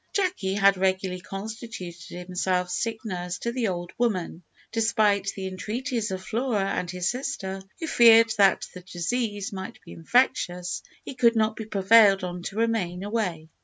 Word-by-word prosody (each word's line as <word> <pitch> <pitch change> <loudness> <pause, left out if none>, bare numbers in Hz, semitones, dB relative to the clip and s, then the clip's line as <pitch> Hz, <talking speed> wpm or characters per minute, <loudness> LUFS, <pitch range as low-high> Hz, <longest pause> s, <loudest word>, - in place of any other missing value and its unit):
Jacky 360 - 0
had 200 -1 +4
regularly 185 -1 0
constituted 195 -4 -7
himself 180 0 -1
sick 220 +4 -2
nurse 180 -3 -4
to 235 - -3
the 240 -2 -1
old 175 -2 -4
woman. 185 -8 -1 0.3
Despite 210 -3 +2
the 195 - -5
entreaties 220 +5 -3
of 190 -1 -4
Flora 220 -5 0
and 180 - -2
his 180 -1 -2
sister, 195 -7 -4 0.2
who 325 - -3
feared 230 -5 +6
that 195 -1 +4
the 180 - -9
disease 205 +3 -3
might 190 +5 -7
be - - -11
infectious, 180 -2 +1 0.2
he - - -6
could 240 -2 +3
not 220 -1 +2
be 220 - -6
prevailed 200 -1 +5
on 180 0 -4
to 195 - -6
remain 205 -6 0
away. 185 -7 -2
195 Hz, 160 wpm, -26 LUFS, 180-230 Hz, 0.3 s, feared